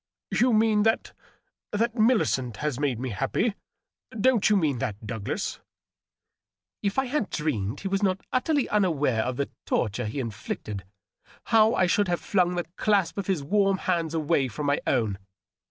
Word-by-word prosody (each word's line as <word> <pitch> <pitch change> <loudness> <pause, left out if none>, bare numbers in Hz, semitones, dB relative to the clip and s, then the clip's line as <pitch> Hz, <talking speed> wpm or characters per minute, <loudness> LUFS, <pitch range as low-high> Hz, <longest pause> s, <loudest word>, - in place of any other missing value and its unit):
" - - -67
You 250 +1 +5
mean 215 -1 +3
that 225 +1 +1 0.3
— - - -52
^that 230 +2 +1
Millicent 215 - +2
has 150 -2 -2
made 135 -6 0
me 130 +1 -3
happy? 135 - 0 0.7
Don't 230 -2 +4
you 210 - +4
mean 150 -8 +1
that, 105 -1 -4
Douglas 105 -1 -3 0.6
?" - - -63
If 200 +2 -1
I 265 - +2
had 255 -4 -1
dreamed 115 -10 -2
he 195 - -3
was 195 +1 0
not 190 -1 0
utterly 275 +2 +1
unaware 150 - +2
of 125 +2 -2
the 140 - -2 0.2
torture 115 +1 0
he 110 +7 -4
inflicted, 105 -4 -5 0.7
how 220 0 +6
I 185 - +3
should 200 +3 +2
have 175 -1 0
flung 180 -3 +1
the 175 - -2
clasp 200 -3 +1
of 195 - -4
his 185 -7 0
warm 195 +4 +2
hands 165 -4 -1
away 155 -3 +1
from 130 +5 -5
my 145 0 +1
own 105 -5 +1
175 Hz, 175 wpm, -26 LUFS, 130-210 Hz, 0.7 s, how